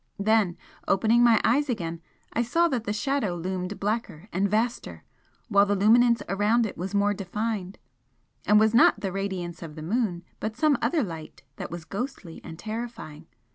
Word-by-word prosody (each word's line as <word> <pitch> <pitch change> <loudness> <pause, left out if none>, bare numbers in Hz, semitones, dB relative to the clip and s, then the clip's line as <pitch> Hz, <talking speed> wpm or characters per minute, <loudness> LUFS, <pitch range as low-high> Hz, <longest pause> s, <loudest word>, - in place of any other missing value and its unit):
Then, 205 -3 +2 0.3
opening 225 +5 +3
my 235 -2 +6
eyes 280 +5 +2
again, 170 -8 -3 0.3
I 235 - +1
saw 335 +9 +2
that 245 -6 -2
the 205 - -1
Shadow 215 -3 -1
loomed 180 +3 -4
blacker 205 -3 -3
and 195 +3 +1
vaster 225 +4 -2 0.4
while 200 -3 +4
the 205 - +1
luminance 235 +4 +4
around 210 +4 +2
it 210 - -5
was 190 +4 -5
more 205 0 +3
defined, 200 0 -4 0.7
and 210 0 +6
was 220 +1 +3
not 235 - +5
the 195 - -2
radiance 190 -3 -4
of 160 -3 -8
the 155 - -8
moon, 185 -2 -1 0.2
but 215 0 -4
some 305 -2 +3
other 320 -5 +1
light 165 -6 -8
that - - -5
was 170 -1 -7
ghostly 200 - -6
and 160 - -9
terrifying. 220 -8 -7
205 Hz, 175 wpm, -26 LUFS, 180-230 Hz, 0.7 s, my